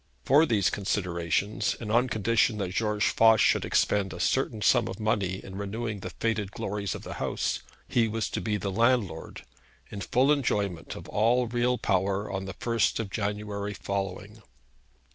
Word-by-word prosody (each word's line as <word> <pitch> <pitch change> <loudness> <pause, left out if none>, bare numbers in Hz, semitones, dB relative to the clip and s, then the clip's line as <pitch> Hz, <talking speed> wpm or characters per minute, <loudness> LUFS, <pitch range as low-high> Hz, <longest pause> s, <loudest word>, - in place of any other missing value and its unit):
For 150 +5 +5
these 105 -7 +2
considerations, 95 0 -1
and 110 -3 -5
on 120 +3 +3
condition 110 +1 +2
that 95 -3 -3
George 105 0 +1
Voss 110 -1 +5
should - - +3
expend 100 -2 +1
a 90 - -8
certain 110 +3 0
sum 120 -3 +4
of 95 - -6
money 100 -4 0
in 95 0 -8
renewing 110 +1 -4
the 95 - -6
faded 110 -3 -2
glories 100 -1 -3
of - - -8
the - - -6
house, - - -1 0.3
he 115 -2 +2
was 110 +1 -2
to - - -2
be 105 -2 -1
the 100 0 -3
landlord 110 -6 0 0.5
in 100 - -6
full 130 +8 +2
enjoyment 100 - -1
of - - -9
all 120 +4 +2
real 120 +1 +1
power 100 0 0
on 95 0 -3
the 95 - -7
first 115 -1 0
of 105 -3 -4
January 105 0 -3
following. 100 +2 -4
105 Hz, 170 wpm, -28 LUFS, 100-115 Hz, 0.5 s, For